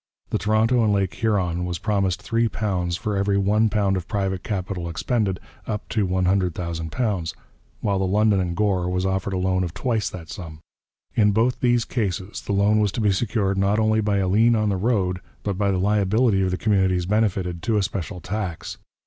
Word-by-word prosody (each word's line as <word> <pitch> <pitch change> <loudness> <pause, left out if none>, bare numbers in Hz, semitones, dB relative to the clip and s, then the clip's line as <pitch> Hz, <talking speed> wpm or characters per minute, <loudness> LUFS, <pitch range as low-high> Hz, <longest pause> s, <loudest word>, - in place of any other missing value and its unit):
The - - +1
Toronto 110 +3 +2
and 105 - +3
Lake 100 -2 +1
Huron 90 -6 0
was 90 -1 -2
promised 95 -2 -1
£3 105 -6 0
for 105 -1 -2
every 100 0 +1
£1 105 0 +2
of 90 -2 -4
private 95 -3 -1
capital 95 -4 -3
expended, 95 +2 -1 0.3
up 105 -1 -4
to 105 -3 0
£100,000, 90 +1 -1 0.5
while 100 -2 0
the 95 - +1
London 105 +1 +3
and 90 -2 -1
Gore 95 -4 +1
was 90 +1 -1
offered 95 +1 -1
a - - 0
loan 95 0 +1
of 85 0 -5
twice 110 -2 0
that 85 -3 -9
sum; 80 -4 -8 0.6
in 105 -2 +3
both 115 +4 +2
these 120 -2 +2
cases 100 -4 -3
the - - -5
loan 100 +2 +3
was 105 -2 +2
to - - -3
be 105 -2 +3
secured 100 -1 0
not 100 +2 +2
only 110 0 +2
by 105 -1 +1
a 95 -1 +1
lien 110 +5 +4
on 110 -1 +1
the 100 - +1
road, 95 -4 0 0.2
but 100 -2 -1
by 100 -1 +2
the 95 - +1
liability 105 +2 +2
of 95 - +1
the 90 - -1
communities 95 -4 +2
benefited 95 -4 0
to 110 +4 +1
a 100 - +2
special 90 -2 -4
tax. 90 -1 -5
100 Hz, 190 wpm, -23 LUFS, 90-105 Hz, 0.6 s, lien